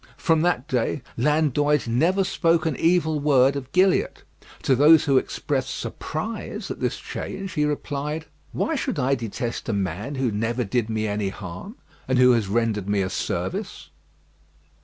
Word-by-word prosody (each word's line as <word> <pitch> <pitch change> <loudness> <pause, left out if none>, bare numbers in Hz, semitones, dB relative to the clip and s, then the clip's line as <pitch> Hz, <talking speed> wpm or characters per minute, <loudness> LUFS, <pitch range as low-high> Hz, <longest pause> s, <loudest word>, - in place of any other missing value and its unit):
From 165 -3 +2
that 165 -6 +1
day 125 +2 -1
Landoys 150 +1 +2
never 165 +12 +2
spoke 170 -3 +1
an 160 -4 0
evil 160 -1 +2
word 140 -2 +4
of 135 -1 -6
Gilliatt. 185 +2 +2 0.4
To 135 - +3
those 150 +4 +6
who 135 -2 +4
expressed - - -3
surprise - - -5
at - - -6
this - - -1
change, 195 -1 -6
he 150 -2 +1
replied, 150 +1 -3 0.3
"Why 325 - -1
should 270 -3 -2
I 135 0 +1
detest 120 -1 -4
a - - 0
man 100 - -3
who 130 -3 0
never 115 +4 -1
did 115 +2 -1
me 110 -1 -1
any 105 -1 -1
harm, 95 - -8 0.3
and 130 0 +1
who 125 0 +6
has 115 -4 +2
rendered 105 -2 0
me 100 -1 +2
a 95 - -3
service?" - - -4
135 Hz, 160 wpm, -24 LUFS, 115-155 Hz, 0.4 s, those